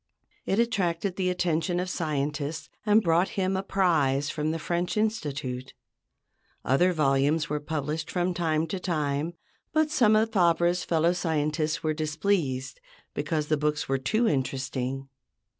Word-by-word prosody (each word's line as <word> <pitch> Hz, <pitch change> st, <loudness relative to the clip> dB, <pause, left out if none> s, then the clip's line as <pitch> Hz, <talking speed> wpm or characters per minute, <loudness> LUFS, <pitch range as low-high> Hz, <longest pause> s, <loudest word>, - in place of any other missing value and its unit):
It 195 Hz, -, +1 dB
attracted 195 Hz, -5 st, 0 dB
the 185 Hz, -1 st, 0 dB
attention 175 Hz, -1 st, 0 dB
of 180 Hz, -, -2 dB
scientists 150 Hz, -3 st, -2 dB, 0.2 s
and 210 Hz, +1 st, +5 dB
brought 170 Hz, +2 st, +3 dB
him 190 Hz, 0 st, +1 dB
a 190 Hz, -, 0 dB
prize 155 Hz, -8 st, +1 dB
from 150 Hz, -1 st, -1 dB
the 160 Hz, -, -1 dB
French 175 Hz, +4 st, -2 dB
Institute. 145 Hz, -, -2 dB, 0.9 s
Other 155 Hz, +9 st, +4 dB
volumes 150 Hz, 0 st, +2 dB
were 150 Hz, -, 0 dB
published 150 Hz, +1 st, -3 dB
from 180 Hz, 0 st, 0 dB
time 160 Hz, -2 st, 0 dB
to 185 Hz, +4 st, -4 dB
time, 155 Hz, -2 st, -1 dB, 0.4 s
but 310 Hz, -1 st, +2 dB
some 235 Hz, -8 st, +4 dB
of 220 Hz, +1 st, +2 dB
Fabre's 175 Hz, -1 st, +3 dB
fellow 165 Hz, +1 st, +2 dB
scientists 155 Hz, -2 st, -1 dB
were 155 Hz, -1 st, +1 dB
displeased 155 Hz, -, -1 dB, 0.3 s
because 155 Hz, -3 st, -1 dB
the 155 Hz, 0 st, +1 dB
books 150 Hz, 0 st, -1 dB
were 135 Hz, 0 st, 0 dB
too 215 Hz, -, +1 dB
interesting! 135 Hz, -, -2 dB
160 Hz, 140 wpm, -27 LUFS, 150-180 Hz, 0.9 s, and